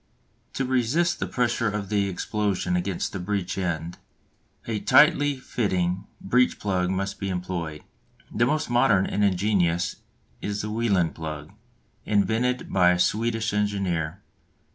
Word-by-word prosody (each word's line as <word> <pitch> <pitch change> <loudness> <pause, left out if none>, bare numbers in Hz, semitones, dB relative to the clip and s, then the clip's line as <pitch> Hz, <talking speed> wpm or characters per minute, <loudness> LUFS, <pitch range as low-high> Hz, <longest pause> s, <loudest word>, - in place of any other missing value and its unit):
To 135 - -1
resist 130 +8 +1
the - - -2
pressure 120 -2 0
of 105 -1 -4
the 100 -2 +1
explosion 95 -1 -1
against 90 +1 -2
the 95 - -3
breech 95 0 -2
end, 85 -2 -3 0.7
a 110 -2 -2
tightly 145 +3 +5
fitting 95 -7 -1
breech 125 +5 +2
plug 90 -3 0
must 95 +1 -2
be 100 - -2
employed. 90 -4 -4 0.5
The 120 - +2
most 155 +2 0
modern 120 -6 +3
and 105 - -1
ingenious 90 -3 +1 0.4
is 105 0 -3
the 105 - -4
Welin 100 -7 +1
plug, 75 -2 -7 0.5
invented 110 +5 0
by 90 -2 +5
a 90 - +3
Swedish 115 +3 0
engineer. 95 -4 -1
100 Hz, 135 wpm, -25 LUFS, 90-115 Hz, 0.7 s, tightly